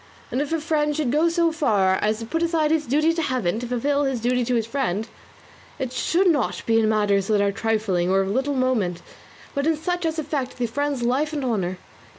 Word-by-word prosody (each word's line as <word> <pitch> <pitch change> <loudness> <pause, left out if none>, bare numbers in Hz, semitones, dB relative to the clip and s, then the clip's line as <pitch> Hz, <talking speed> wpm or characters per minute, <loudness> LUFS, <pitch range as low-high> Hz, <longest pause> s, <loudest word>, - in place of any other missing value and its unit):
And 255 - 0
if 290 - -3
a 325 - +1
friend 300 -1 0
should 290 -6 0
go 310 +4 +3
so 335 0 +2
far 200 -12 +2
as 215 +1 +1
to 225 - -6
put 325 +8 -2
aside 325 -2 +1
his 315 -2 +1
duty 305 +6 +2
to 330 - -1
Heaven 245 - -1
to 245 - -5
fulfil 280 +4 0
his 265 -3 -1
duty 245 +2 +1
to 250 +1 0
his 225 -2 +1
friend, 225 -4 -2 0.7
it 255 -1 -4
should 340 +8 +1
not 300 -9 +1
be 225 0 +3
in 220 -1 +2
matters 205 -2 +2
that 215 -2 +2
are 200 0 +2
trifling 210 -4 0
or 195 +1 +3
of 190 - -2
little 270 +5 0
moment, 230 -10 0 0.5
but 280 +1 -1
in 320 -1 +2
such 355 +3 -2
as 320 0 -2
affect 290 -4 -3
the 245 - 0
friend's 280 +2 -2
life 275 +6 0
and 285 -3 -2
honour. 190 -7 -1
255 Hz, 225 wpm, -23 LUFS, 220-300 Hz, 0.7 s, go